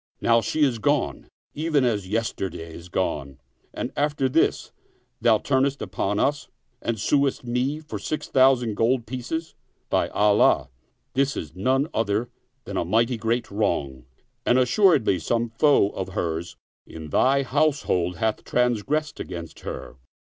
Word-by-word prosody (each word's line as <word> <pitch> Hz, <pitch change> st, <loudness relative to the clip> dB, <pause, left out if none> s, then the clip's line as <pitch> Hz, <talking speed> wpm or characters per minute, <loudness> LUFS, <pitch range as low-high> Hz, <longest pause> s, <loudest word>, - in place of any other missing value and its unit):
Now 115 Hz, 0 st, +3 dB
she 155 Hz, +6 st, 0 dB
is 125 Hz, -5 st, +2 dB
gone, -, -, 0 dB, 0.2 s
even 150 Hz, -3 st, +1 dB
as 105 Hz, -6 st, 0 dB
yesterday 95 Hz, -6 st, -3 dB
is 85 Hz, +2 st, -11 dB
gone; 70 Hz, -7 st, -2 dB, 0.3 s
and 120 Hz, -, -4 dB
after 145 Hz, -2 st, +1 dB
this 155 Hz, +5 st, +1 dB, 0.5 s
thou 115 Hz, -1 st, +5 dB
turnest 135 Hz, +3 st, +1 dB
upon 100 Hz, +1 st, -2 dB
us 145 Hz, +2 st, 0 dB, 0.3 s
and 115 Hz, -2 st, -2 dB
suest 140 Hz, +5 st, +1 dB
me 125 Hz, +5 st, -1 dB
for 155 Hz, -, -7 dB
six 155 Hz, -, -4 dB
thou 135 Hz, 0 st, +5 dB
sand 120 Hz, -4 st, -4 dB
gold 120 Hz, +1 st, +2 dB
pieces. 130 Hz, +8 st, -4 dB, 0.4 s
By -, -, +2 dB
Allah, 105 Hz, -8 st, +3 dB, 0.4 s
this 140 Hz, +1 st, +1 dB
is 80 Hz, +1 st, -6 dB
none 130 Hz, +9 st, +1 dB
other 110 Hz, +2 st, 0 dB, 0.3 s
than -, -, -5 dB
a -, -, +1 dB
mighty 115 Hz, +7 st, +1 dB
great 115 Hz, +1 st, -1 dB
wrong, 70 Hz, -, -1 dB, 0.4 s
and 120 Hz, -, +3 dB
assuredly 130 Hz, -, +4 dB
some 115 Hz, +7 st, -1 dB
foe 115 Hz, -2 st, +3 dB
of 95 Hz, -1 st, -5 dB
hers 85 Hz, 0 st, -3 dB, 0.3 s
in 80 Hz, -1 st, -9 dB
thy 135 Hz, -, +3 dB
house 145 Hz, +3 st, +1 dB
hold 90 Hz, 0 st, 0 dB
hath 110 Hz, +4 st, -1 dB
transgressed 125 Hz, +6 st, 0 dB
against 85 Hz, -3 st, -7 dB
her -, -, -7 dB
120 Hz, 150 wpm, -24 LUFS, 100-135 Hz, 0.5 s, thou